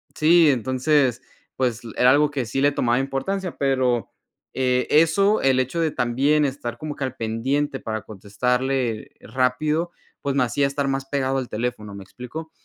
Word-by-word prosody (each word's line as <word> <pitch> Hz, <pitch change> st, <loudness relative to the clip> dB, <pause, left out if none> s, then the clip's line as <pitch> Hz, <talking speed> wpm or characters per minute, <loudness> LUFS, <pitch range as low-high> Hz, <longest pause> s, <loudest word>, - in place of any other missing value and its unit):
sí, 165 Hz, +1 st, +5 dB
entonces, 130 Hz, +1 st, +1 dB, 0.3 s
pues 125 Hz, -4 st, -1 dB
l 115 Hz, -, -8 dB
era 125 Hz, +1 st, +6 dB
algo 145 Hz, +2 st, +4 dB
que 135 Hz, -4 st, -2 dB
sí 120 Hz, +4 st, -3 dB
le 145 Hz, +1 st, +4 dB
tomaba 120 Hz, -3 st, +1 dB
importancia, 170 Hz, +8 st, -3 dB
pero, 130 Hz, -4 st, +1 dB, 0.4 s
eh, 125 Hz, -1 st, +1 dB
eso, 195 Hz, +7 st, +4 dB
el 130 Hz, -1 st, +3 dB
hecho 130 Hz, +6 st, -1 dB
de 160 Hz, -, +1 dB
también 140 Hz, +5 st, +1 dB
estar 130 Hz, -4 st, -4 dB
como 155 Hz, -1 st, -5 dB
que -, -, -5 dB
al 130 Hz, -1 st, -3 dB
pendiente 135 Hz, +6 st, -1 dB
para 110 Hz, -1 st, -4 dB
contestarle 125 Hz, +4 st, -2 dB
rápido, 140 Hz, +8 st, 0 dB, 0.3 s
pues, 140 Hz, -1 st, -2 dB
me 140 Hz, -, +3 dB
hacía 140 Hz, +3 st, +1 dB
estar 140 Hz, 0 st, -2 dB
más 135 Hz, 0 st, -1 dB
pegado 135 Hz, -1 st, -1 dB
al 130 Hz, -2 st, -3 dB
teléfono, 110 Hz, -2 st, -4 dB
¿me 100 Hz, -, -8 dB
explico? 155 Hz, +10 st, -9 dB
130 Hz, 170 wpm, -23 LUFS, 125-145 Hz, 0.4 s, era